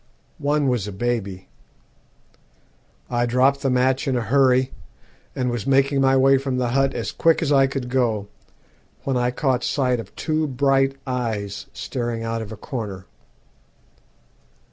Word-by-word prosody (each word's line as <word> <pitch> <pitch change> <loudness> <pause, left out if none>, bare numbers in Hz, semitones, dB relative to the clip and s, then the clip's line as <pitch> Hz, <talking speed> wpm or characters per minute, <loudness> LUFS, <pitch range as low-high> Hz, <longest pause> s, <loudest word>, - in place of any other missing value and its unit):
One 145 0 +1
was 120 -6 0
a - - -5
baby. 100 -3 -3 1.6
I 120 0 0
dropped 130 +3 +3
the 135 - +1
match 130 +1 +1
in 130 -2 +1
a - - 0
hurry, 130 +2 +3 0.6
and 125 -1 -1
was 120 -2 -4
making 135 +1 +3
my 135 0 +4
way 135 0 +5
from 135 -1 -2
the 125 -1 0
hut 135 +2 +1
as - - -3
quick 165 0 +2
as 150 - 0
I 135 -1 +5
could 135 -2 -4
go, 120 -5 0 0.8
when 135 - -1
I 125 0 +1
caught 125 -1 0
sight 125 -3 +1
of 115 - -9
two 155 0 -1
bright 135 0 +2
eyes 115 -6 -3
staring 120 -2 -4
out 115 0 -2
of 110 -1 -7
a 110 - -7
corner. 100 -5 -6
125 Hz, 155 wpm, -22 LUFS, 120-135 Hz, 1.6 s, way